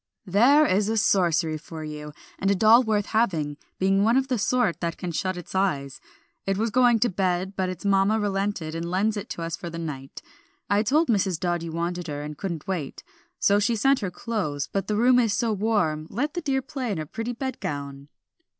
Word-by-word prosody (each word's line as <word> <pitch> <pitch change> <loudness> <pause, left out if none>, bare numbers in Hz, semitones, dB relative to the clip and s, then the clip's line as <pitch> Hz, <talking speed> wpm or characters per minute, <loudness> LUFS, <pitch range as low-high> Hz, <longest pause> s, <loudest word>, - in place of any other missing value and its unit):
"There 250 - +5
is 205 -3 +2
sorcery 170 -6 +2
for 160 +1 -8
you, 150 -1 -7 0.3
and 195 - +1
a 200 - +3
doll 220 +5 +6
worth 215 -4 0
having; 165 -11 0 0.2
being 195 +1 +2
one 230 +4 +4
of 265 0 0
the 250 -3 0
sort 235 -3 +1
that 170 -1 -3
can 180 - -4
shut 185 +3 -2
its 175 - -9
eyes; 145 -9 -1 0.5
it 195 0 +1
was 225 +2 0
going 245 -1 +4
to 245 - +4
bed, 185 0 -1
but 185 -1 -1
its 185 +1 -7
mamma 200 +2 +3
relented 195 -5 -2
and 165 +1 -4
lends 205 +4 +1
it 205 +1 -5
to 170 - -5
us 165 0 -3
for 175 - -7
the 165 - -7
night. 140 -5 -6 0.5
I 205 +1 +4
told 295 +9 +2
Mrs. 190 -6 +1
Dodd 175 -2 -1
you 165 -1 -5
wanted 170 +1 -3
her, 145 -1 -4
and 150 0 -6
couldn't 170 -2 -5
wait, 170 -8 -4 0.3
so 200 +1 +3
she 210 +3 +1
sent 270 +5 +3
her 200 - -2
clothes; 180 - -3
but 195 -1 -1
the 210 - 0
room 245 +3 +5
is 225 -4 +2
so 225 0 0
warm 190 -8 0
let 290 +5 -2
the 350 - -3
dear 270 -3 0
play 265 -6 -4
in 195 - -2
her 155 - -3
pretty 225 +9 -4
bed 260 +1 -4
gown." 140 -1 -5
195 Hz, 215 wpm, -25 LUFS, 165-225 Hz, 0.5 s, doll